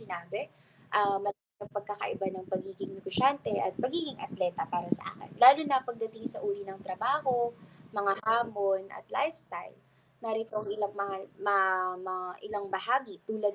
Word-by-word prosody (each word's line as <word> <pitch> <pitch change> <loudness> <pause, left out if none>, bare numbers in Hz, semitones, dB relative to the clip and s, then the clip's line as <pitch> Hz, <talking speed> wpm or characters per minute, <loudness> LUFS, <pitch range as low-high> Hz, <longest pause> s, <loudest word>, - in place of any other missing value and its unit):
sinabi. 180 -1 -5 0.5
Ah, 200 -1 +5
malaki 205 0 -3 0.2
ang 205 - -10
pagkakaiba 205 -1 -3
ng 185 0 -8
pagiging 190 0 -4
negosyante 255 +7 +2
at - - -1
pagiging 290 -1 -1
atleta 180 -1 -1
para 175 0 -1
sa - - -11
akin, - - -14
lalo 265 +4 +12
na 265 -2 +3
pagdating 225 -1 -5
sa - - -5
uri 200 0 -1
ng 195 0 -9
trabaho, 265 +8 +1 0.6
mga 200 -1 +4
hamon 210 -4 +3
at - - -12
lifestyle. 310 +4 -3 0.5
Narito 225 0 -2
ang 215 -1 -2
ilang 205 -1 -2
mga 200 -1 -2 0.3
ma 200 -1 +6 0.5
ma 185 - -2 0.3
ilang 205 -1 -3
bahagi 255 - +1
tulad 215 -2 0
205 Hz, 150 wpm, -31 LUFS, 195-235 Hz, 0.6 s, lalo